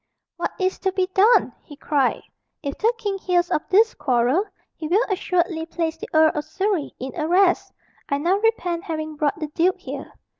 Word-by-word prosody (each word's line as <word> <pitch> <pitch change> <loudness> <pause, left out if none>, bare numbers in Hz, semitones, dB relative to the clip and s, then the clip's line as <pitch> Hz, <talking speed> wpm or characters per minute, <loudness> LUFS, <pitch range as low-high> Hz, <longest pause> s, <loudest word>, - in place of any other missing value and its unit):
"What - - -1
is 375 0 0
to 380 - 0
be 375 -1 0
done?" 430 +5 +4
he 290 - -13
cried. 280 -3 0 0.4
"If 280 -1 -3
the 450 +2 +3
king 405 -3 -3
hears 355 -1 +1
of 305 - +2
this 440 +4 +4
quarrel, 260 - +1 0.3
he 315 - -5
will 405 +9 +3
assuredly 350 -3 0
place 330 -1 -2
the - - -9
Earl 315 0 +5
of 300 - -2
Surrey 375 +1 -2
in 260 +1 -5
arrest. 355 +3 +2 0.4
I 280 - +1
now 345 +7 +2
repent 370 -6 0
having 310 -3 -4
brought 295 0 0
the 305 -2 -4
duke 345 +5 +1
here." - - -7
345 Hz, 185 wpm, -23 LUFS, 305-385 Hz, 0.4 s, Earl